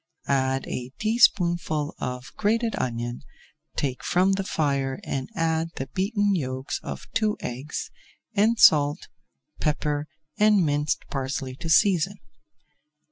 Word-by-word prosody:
Add 135 -1 +1
a 125 0 -4
teaspoonful 175 -9 +2
of 125 0 -5
grated 225 +2 +1
onion, 120 0 -3 0.5
take 135 -4 -2
from 185 +2 +3
the 195 0 0
fire 140 -6 -1
and 130 -1 -3
add 165 0 0
the 135 - -5
beaten 205 +1 +1
yolks 130 -6 -2
of - - -6
two 215 -1 +1
eggs, 130 +5 -5 0.4
and 220 +3 +3
salt, 145 -1 +5 0.5
pepper, 150 -1 -1 0.3
and 210 -4 +5
minced 145 0 0
parsley 135 -1 -3
to 165 - -5
season. 195 +2 +3
150 Hz, 120 wpm, -25 LUFS, 135-195 Hz, 0.5 s, salt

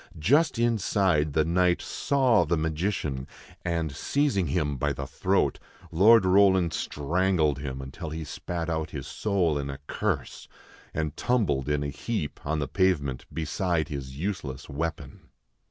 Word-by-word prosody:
Just 140 - +3
inside 95 -9 +2
the 80 0 +3
Knight 90 +1 +2
saw 130 -8 +2
the 85 +1 0
magician; 80 -4 -2 0.4
and, 85 -3 -1
seizing 135 - +1
him 75 -1 0
by 75 +1 0
the 70 0 -5
throat, 65 - 0 0.3
Lord 100 +5 +6
Roland 95 -3 +4
strangled 80 -1 0
him 65 -1 -5
until 70 +5 -7
he 80 +1 -5
spat 85 +2 -4
out 80 -2 -2
his 70 -3 -6
soul 85 0 0
in 70 0 -4
a 70 - -5
curse, - - -3 0.4
and 75 -2 -2
tumbled 75 - 0
in 75 0 +1
a 70 - -2
heap 75 +3 -4
on 80 +2 -1
the 75 -2 -1
pavement 70 -8 0
beside 80 +2 -1
his 70 -3 -6
useless 75 -6 -4
weapon. 75 -1 -5
80 Hz, 145 wpm, -27 LUFS, 70-95 Hz, 0.4 s, Lord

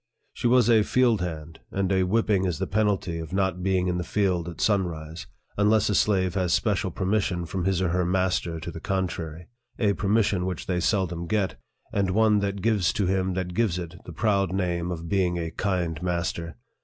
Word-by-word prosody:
She - - -1
was 125 -1 +4
a 115 -2 +5
field 120 -2 +2
hand, 80 -2 -5
and 95 -1 -1
a 95 -1 +3
whipping 100 0 +2
is 90 -4 -1
the - - -1
penalty 100 -5 0
of 80 -2 -7
not 95 -2 0
being 95 -1 +1
in 90 -1 0
the - - -2
field 90 -3 0
at 85 - -10
sunrise, 85 -6 -1 0.3
unless 105 +1 +3
a - - +1
slave 95 -3 +2
has 90 -3 0
special 100 -4 0
per 95 +3 -4
mission 95 -3 0
from 85 +2 -3
his 95 -1 +1
or 90 - +1
her 90 +1 +1
master 90 -2 0
to - - -5
the - - -8
contrary 90 -4 -3 0.3
a 105 -3 +2
oermission 100 -3 +1
which 90 -3 -4
they 90 0 -1
seldom 90 -3 0
get, 105 -2 0 0.4
and 100 -2 +1
one 105 +2 +3
that 100 -1 -2
gives 105 -6 +2
to 100 - 0
him 95 0 0
that 90 -1 -3
gives 105 -4 +1
it 85 -2 -6
the - - -8
proud 100 0 +1
name 90 -2 -1
of 85 -1 -5
being 90 -2 +1
a 80 -1 -3
kind 90 -5 -2
master. 85 -2 -2
95 Hz, 205 wpm, -26 LUFS, 85-100 Hz, 0.4 s, a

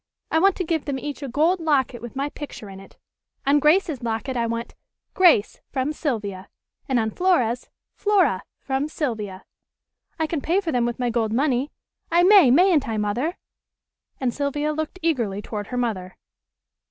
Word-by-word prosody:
I 320 - +3
want 390 +2 +4
to 370 - -2
give 320 -3 -1
them 280 -2 -2
each 290 +2 -6
a 280 - -4
gold 315 +8 +2
locket 270 -7 +1
with 240 +1 -8
my 280 +2 -1
picture 280 -9 -8
in 190 - -10
it. 195 - -16 0.5
On 285 +2 +4
Grace's 305 -1 +3
locket 235 +3 -3
I 235 -1 0
want 230 +1 -4 0.4
'Grace 340 - +4
from 270 +2 -1
Sylvia,' 205 - -3 0.4
and 260 - +2
on 220 -1 0
Flora's, 250 - +1 0.2
'Flora 370 - +2 0.2
from 270 +2 -2
Sylvia.' 215 - -4 0.7
I 320 - +1
can 310 -2 -2
pay 345 +7 +2
for 350 -5 -2
them 245 -3 +1
with 240 - -3
my 245 -1 -1
gold 225 -2 0
money. 265 +2 +1 0.4
I 345 +1 +5
may, 375 -7 +7
mayn't 310 -1 +4
I, 220 - -1
Mother?" 235 - -1 0.8
and 250 -3 0
Sylvia 290 +1 -1
looked 315 +3 -4
eagerly 235 -12 0
toward 210 -1 -5
her 250 - -4
mother. 195 -7 -3
270 Hz, 175 wpm, -23 LUFS, 230-315 Hz, 0.8 s, may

